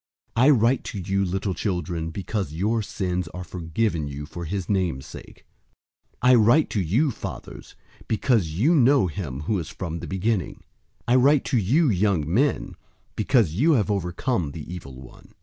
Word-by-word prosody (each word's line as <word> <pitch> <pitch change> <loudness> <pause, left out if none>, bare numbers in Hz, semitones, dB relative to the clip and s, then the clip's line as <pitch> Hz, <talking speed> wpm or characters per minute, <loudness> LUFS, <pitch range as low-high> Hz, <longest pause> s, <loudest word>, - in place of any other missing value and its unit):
002:012 115 - +3
I - - +7
write 125 -1 +3
to 105 - -5
you, 95 +2 0
little 95 +2 -2
children, 85 -4 -3
because 95 -1 -4
your 105 +7 0
sins 90 -4 -3
are 90 - -5
forgiven 85 -1 -2
you 70 +1 -6
for 85 +3 -7
his 95 +2 -3
name's 90 -10 -1
sake. - - -12 0.8
002:013 125 - +5
I - - +7
write 120 +6 +5
to 105 - 0
you, 120 - +1
fathers, - - -8 0.3
because 110 -4 +1
you 105 - +2
know 135 - +4
him 80 -6 -5
who 95 +6 -1
is 80 - -6
from 85 -3 -5
the 85 - -7
beginning. 95 +3 -2 0.4
I 120 - +3
write 140 +2 +4
to - - +5
you, 140 - +2
young 95 -5 +1
men, 125 - 0 0.4
because 110 - +2
you 150 - +3
have 110 -6 +1
overcome 90 - -1
the 80 +2 -7
evil 70 -8 -9
one. 65 - -15
95 Hz, 175 wpm, -24 LUFS, 85-115 Hz, 0.8 s, I